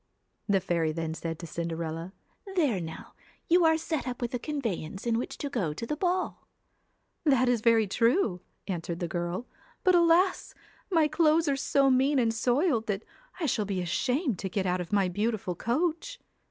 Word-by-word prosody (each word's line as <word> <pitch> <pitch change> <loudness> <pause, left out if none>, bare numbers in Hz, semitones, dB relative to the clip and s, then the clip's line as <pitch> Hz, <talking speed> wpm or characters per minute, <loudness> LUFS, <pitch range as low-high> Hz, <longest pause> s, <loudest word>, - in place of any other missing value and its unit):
The 195 -1 +4
fairy 170 -3 0
then 160 0 -3
said 165 0 -4
to 170 - -8
Cinderella: 165 +1 -4 0.2
' 390 -2 -13
There 275 - +2
now, 160 -1 -8 0.3
you 345 0 +5
are 320 0 +5
set 320 -3 -3
up 250 -1 -4
with 240 0 -3
a 245 - -1
conveyance 225 - -4
in 230 -1 +1
which - - -5
to 285 - -3
go 180 - -1
to 230 - -5
the 300 - -2
ball.' 365 +3 -1 0.4
' - - -46
That 270 -5 +3
is 245 -3 +2
very 225 -1 +4
true,' 230 - +1 0.3
answered 170 -3 -3
the 175 - -2
girl, 175 +6 -3 0.2
' - - -32
but, 370 - +5
alas! 350 +2 +3 0.3
my 325 -5 +4
clothes 315 +1 +3
are 280 - +2
so 275 0 +2
mean 270 +3 +3
and 230 -3 +2
soiled, 245 +1 +1
that 205 0 -2 0.4
I 335 - -1
shall 220 -6 0
be 195 -2 -2
ashamed 245 - 0
to 190 - -3
get 190 +1 -1
out 180 0 0
of 175 - -7
my 200 -2 +3
beautiful 205 0 -1
coach.' 330 - -1
230 Hz, 195 wpm, -28 LUFS, 180-300 Hz, 0.4 s, you